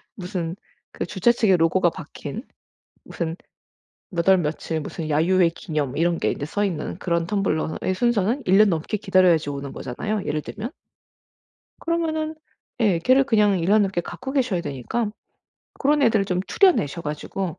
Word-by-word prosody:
무슨 180 -3 -4 0.4
그 - - -4
주최 200 +4 +2
측의 220 -5 +3
로고가 175 +2 +3
박힌 165 - -8 0.6
무슨 165 -1 -4 0.7
몇 170 -2 -1
월 190 -1 +7
며칠 160 0 -2
무슨 155 +1 -5
야유회 170 +4 +3
기념 150 -5 -3
이런 170 +1 +1
게 - - +1
인제 145 - -5
써 205 +6 -1
있는 170 -7 -3
그런 170 -2 -1
텀블러의 185 -2 -1
순서는 235 +4 +1
1 190 +2 +5
년 215 0 +6
넘게 165 +5 -2
기다려야지 185 -7 +3
오는 140 -1 -5
거잖아요 205 - -4
예를 150 - -1
들면. 215 - -6 1.1
그러면은 315 -2 -1 0.5
예. 200 -7 +3
걔를 255 +10 +4
그냥 210 -6 +3
1 170 +1 -1
년 210 +1 +5
넘게 190 -3 0
갖고 260 +9 -7
계셔야 250 -10 +1
되니까 175 - -3 0.7
고런 295 +1 +2
애들을 220 -5 +3
좀 180 -2 -1
추려내셔 180 - +2
가지고 155 +4 -4
185 Hz, 315 characters per minute, -23 LUFS, 165-215 Hz, 1.1 s, 월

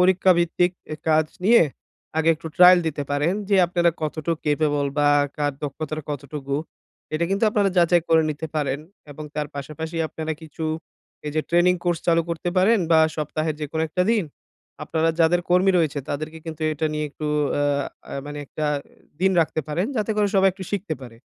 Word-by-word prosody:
পরীক্ষাভিত্তিক 180 -1 +3 0.2
এ - - -1
কাজ 155 0 +4 0.2
নিয়ে, 235 0 +7 0.6
আগে 160 +1 +2
একটু 160 +1 -10
ট্রায়াল 180 0 +8
দিতে 145 -2 -2
পারেন। 145 +5 +1 0.2
যে 200 - +4
আপনারা 170 -1 +2
কতটুক 155 +1 -2
ক্যাপেবল 145 -1 +1
বা 145 0 +4 0.3
কার 145 -1 0
দক্ষতাটা 155 +1 -4
কতটুকু? 140 -1 -4 0.6
এটা 170 +2 +1
কিন্তু 200 +3 +2
আপনারা 205 -2 +2
যাচাই 175 -1 +4
করে 160 -1 +5
নিতে 155 +2 -4
পারেন 140 -2 0 0.3
এবং 150 +2 -8
তার 150 -1 -2
পাশাপাশি 155 +4 -6
আপনারা 160 0 -4
কিছু 160 0 -7 0.6
এই 150 - -2
যে 155 - +2
ট্রেনিং 175 +1 +4
কোর্স 175 -2 +1
চালু 170 -1 +4
করতে 170 +1 -3
পারেন, 205 +4 +4
বা 160 - +6 0.2
সপ্তাহের 155 +1 -2
যেকোনো 160 +2 -2
একটা 180 +4 0
দিন 210 -6 +1 0.6
আপনারা 160 0 0
যাদের 175 +2 +4
কর্মী 180 +2 +5
রয়েছে 150 -3 0
তাদেরকে 155 +3 -4
কিন্তু 160 -1 -6
এটা 155 +1 -1
নিয়ে 150 0 -2
একটু 155 - -6 0.3
আ - - +2 0.5
আ - - -7
মানে 145 0 -6
একটা 155 - -5 0.6
দিন 190 0 +4
রাখতে 160 0 0
পারেন। 175 +7 0
যাতে 215 +1 -1
করে 205 -1 +3
সবাই 195 0 +5
একটু 190 0 -8
শিখতে 200 -5 -2
পারে। 120 -3 -11
160 Hz, 175 wpm, -23 LUFS, 150-175 Hz, 0.6 s, ট্রায়াল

